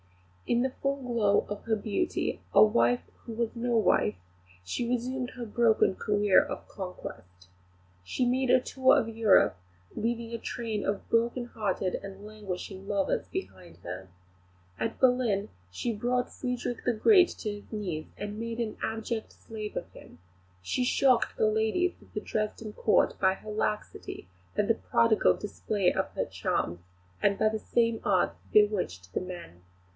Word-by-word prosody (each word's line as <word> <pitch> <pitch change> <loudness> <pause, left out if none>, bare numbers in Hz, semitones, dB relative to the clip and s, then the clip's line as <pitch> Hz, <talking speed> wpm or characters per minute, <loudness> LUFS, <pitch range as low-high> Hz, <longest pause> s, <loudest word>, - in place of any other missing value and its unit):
In 240 +1 +2
the 260 - 0
full 275 0 +1
glow 230 -5 +2
of 205 0 -6
her 225 -1 +2
beauty, 215 - -1
a - - +8
wife 235 +3 +3 0.2
who 230 - -7
was 230 +1 -2
no 240 0 +1
wife, 105 - +3 0.5
she 235 - -2
resumed 250 +1 -1
her 240 - -4
broken 225 -3 +3
career 205 -1 +4
of - - -7
conquest. 90 - -9 0.6
She 245 - -1
made 255 +1 +1
a 255 - +6
tour 260 +1 +3
of 225 - -2
Europe, 220 - +4 0.4
leaving 230 +1 -2
a 230 - -3
train 220 -4 -3
of 200 0 -2
broken 235 +2 +1
hearted 200 -5 -2
and 195 +1 -9
languishing 195 -2 -6
lovers 200 -2 0
behind 185 - -7
her. 90 +2 -7 0.7
At 225 - -3
Berlin 245 -6 +3 0.2
she 225 - -2
brought 245 +3 -1
Frederick 250 -2 -3
the 245 - +2
Great 365 - +6
to 215 - -3
his - - -23
knees, 185 -8 -3
and 205 +1 -5
made 230 +1 -4
an 225 -2 -2
abject 225 0 -3
slave 215 -2 -7
of - - -4
him; - - -14 0.4
she 90 - -1
shocked 255 0 +3
the 215 - +3
ladies 220 +12 +1
of - - -19
the 210 - -2
Dresden 215 0 -3
Court 215 - +2
by 190 -1 +4
her 215 - -9
laxity 210 - -3 0.3
and 205 - +1
the 230 - +4
prodigal 230 -1 +3
display 205 -2 0
of - - -1
her - - 0
charms, 85 +1 -2 0.4
and 200 -1 +3
by - - +3
the 220 0 0
same 230 0 +1
arts 190 -3 +2 0.2
bewitched 180 - +2
the - - 0
men. 175 - -8
220 Hz, 160 wpm, -29 LUFS, 200-240 Hz, 0.7 s, a